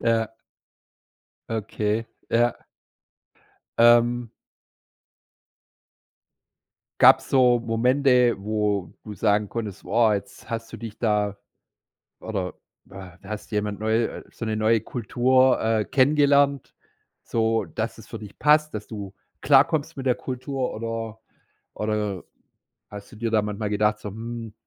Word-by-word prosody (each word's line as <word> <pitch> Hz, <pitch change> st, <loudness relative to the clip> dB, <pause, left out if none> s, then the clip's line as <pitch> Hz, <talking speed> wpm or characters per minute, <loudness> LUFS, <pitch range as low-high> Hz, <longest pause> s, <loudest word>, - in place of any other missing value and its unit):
Ja. 115 Hz, -1 st, +1 dB, 1.2 s
Okay, 110 Hz, 0 st, -2 dB, 0.3 s
ja. 120 Hz, 0 st, +3 dB, 1.3 s
Ähm 120 Hz, 0 st, +4 dB, 2.7 s
Gab's -, -, +6 dB
so 125 Hz, -2 st, +4 dB
Momente, 125 Hz, +1 st, +3 dB
wo 105 Hz, -3 st, -1 dB
du 105 Hz, -, -7 dB
sagen 105 Hz, 0 st, +1 dB
konntest: 110 Hz, -5 st, -6 dB
Woah, 110 Hz, +3 st, +3 dB
jetzt 100 Hz, -, -7 dB
hast 115 Hz, 0 st, -5 dB
du -, -, -6 dB
dich 110 Hz, -2 st, -9 dB
da 105 Hz, -3 st, 0 dB, 0.8 s
oder 95 Hz, -5 st, -4 dB, 0.3 s
we 95 Hz, -2 st, -12 dB
hast 105 Hz, -1 st, -7 dB
jemand 105 Hz, -1 st, -2 dB
neu 110 Hz, +1 st, 0 dB
so 115 Hz, -, -7 dB
'ne 110 Hz, -1 st, -1 dB
neue 110 Hz, +1 st, +3 dB
Kultur, 130 Hz, +3 st, +2 dB
äh, 110 Hz, -1 st, +1 dB
kennengelernt? 140 Hz, 0 st, +3 dB, 0.5 s
So, 115 Hz, -1 st, 0 dB
dass 80 Hz, -, -5 dB
es -, -, -13 dB
für -, -, -7 dB
dich 105 Hz, -2 st, -12 dB
passt, 150 Hz, -1 st, +3 dB
dass 105 Hz, -, -5 dB
du 100 Hz, -3 st, -8 dB, 0.3 s
klarkommst 145 Hz, +2 st, +3 dB
mit 135 Hz, -1 st, -6 dB
der 125 Hz, -, +4 dB
Kultur 130 Hz, +1 st, -4 dB
oder 115 Hz, 0 st, -5 dB, 0.6 s
oder 105 Hz, -3 st, -2 dB, 0.7 s
hast 105 Hz, +3 st, -10 dB
du -, -, -12 dB
dir 115 Hz, +1 st, -2 dB
da 110 Hz, -1 st, +2 dB
manchmal 105 Hz, 0 st, -3 dB
gedacht 105 Hz, 0 st, +1 dB
so: 105 Hz, -, -6 dB
„Mhm, 115 Hz, +1 st, -7 dB
115 Hz, 120 wpm, -24 LUFS, 105-120 Hz, 2.7 s, Gab's